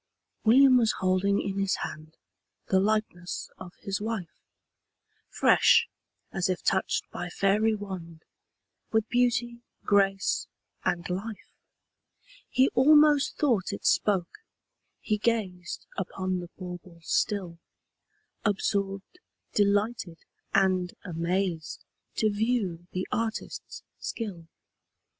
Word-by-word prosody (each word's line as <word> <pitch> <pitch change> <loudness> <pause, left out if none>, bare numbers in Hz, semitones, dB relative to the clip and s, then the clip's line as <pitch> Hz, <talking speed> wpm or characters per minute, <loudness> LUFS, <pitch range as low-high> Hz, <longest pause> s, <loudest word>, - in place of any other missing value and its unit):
William 255 +3 +7
was 230 -3 +3
holding 190 +2 +1
in 195 0 -2
his 195 -1 +1
hand 155 +1 -7 0.5
The 190 - +4
likeness 200 -3 -1
of 185 -1 -10
his 195 +1 -3
wife! 215 -6 -4 0.9
Fresh, - - +5 0.4
as 190 -1 0
if 185 - -2
touched 190 - +1
by 175 - -5
fairy 210 +4 +2
wand, 180 -6 -8 0.7
With 220 0 +2
beauty, 240 -1 +1 0.2
grace, 195 -1 +2 0.4
and 175 0 -1
life. 200 +4 -5 1.0
He 260 +1 +4
almost 295 +2 +5
thought 235 -11 +1
it 200 - -7
spoke: 195 - +1 0.6
he 215 -2 -1
gazed 195 -6 -2
Upon 185 -1 -2
the 175 -1 -8
bauble 180 -2 -9
still, 180 -2 -1 0.8
Absorbed, 200 - -1 0.3
delighted, 205 -3 +1 0.3
and 185 -2 +2
amazed, 170 -1 -2 0.3
To 215 -1 +2
view 205 -6 -1
the 185 0 -3
artist's 225 -1 -4 0.2
skill. 190 -8 -5
195 Hz, 100 wpm, -28 LUFS, 180-220 Hz, 1.0 s, William